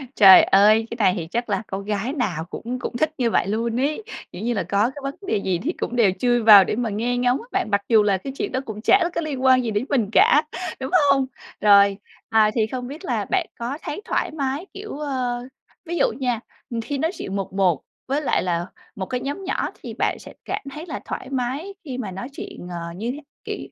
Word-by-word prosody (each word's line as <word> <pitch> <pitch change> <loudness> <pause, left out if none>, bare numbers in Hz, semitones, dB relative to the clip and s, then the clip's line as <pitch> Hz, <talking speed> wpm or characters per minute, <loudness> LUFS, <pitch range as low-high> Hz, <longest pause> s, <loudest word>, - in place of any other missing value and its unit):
Trời 195 -3 +9
ơi! 215 +3 +5
Cái - - -3
này 200 -5 +4
thì 165 -2 -4
chắc 235 +6 -3
là 200 0 0
con 195 +1 -5
gái 210 +5 -2
nào 185 - -2
cũng 240 +7 -5
cũng 240 - -4
thích 310 +4 +1
như 240 -4 +1
vậy - - +2
luôn 230 +3 -1
ấy. 300 +10 -1 0.3
Kiểu 180 - -8
như 240 +2 0
là, 210 - -1
có 205 +4 +1
cái - - -7
vấn 275 0 -3
đề 215 - +1
gì 190 -3 -1
thì 330 +7 -1
cũng 245 - -4
đều 225 -6 +4
chui 240 +1 +3
vào 210 -3 +10
để 190 - -2
mà 235 0 -1
nghe 235 +4 -1
ngóng 245 +1 +2
á - - -12
bạn, - - 0
mặc 200 0 +3
dù 220 -3 +6
là 200 -2 +2
cái 265 +8 -7
chuyện - - -2
đó 260 - 0
cũng 215 -1 -6
chả 345 - +4
có - - 0
liên 285 -5 -4
quan 260 -1 +5
gì 230 - -2
đến 210 +4 -1
mình 235 -8 +1
cả, 295 +6 +5 0.4
đúng 265 +2 -4 0.2
hông? 270 -1 +3 0.4
Rồi, 200 -1 +6 0.3
à, 220 -1 +4
thì 220 -2 +2
không 250 +1 -5
biết 300 +8 -8
là - - -1
bạn 375 -3 0
có 240 +4 -3
thấy 300 - -5
thoải - - -1
mái, 285 +2 -2
kiểu, 400 -5 -7
ờ, 255 -4 -2 0.4
ví 345 +1 -3
dụ - - +4
nha, 245 -4 0 0.3
ừm, 235 -1 -3
khi 280 +5 -3
nói 320 +5 0
chuyện 195 - -5
1-1 190 -5 +1 0.3
với 275 +3 0
lại 285 - +1
là 175 -1 -1 0.3
1 195 -3 -3
cái 250 +6 -3
nhóm 285 +8 -4
nhỏ 380 - -1
thì - - -6
bạn - - -1
sẽ - - -12
cảm - - -3
thấy 305 +4 -7
là 315 -5 -5
thoải 260 - -5
mái 270 +8 -3
khi 260 -4 -5
mà 215 -7 -4
nói 195 +6 -6
chuyện, 180 - -8
ờ, 170 -1 -5
như 225 +6 -3
thế 290 +3 -7 0.2
kiểu, - - -4
240 Hz, 245 wpm, -23 LUFS, 205-275 Hz, 0.4 s, vào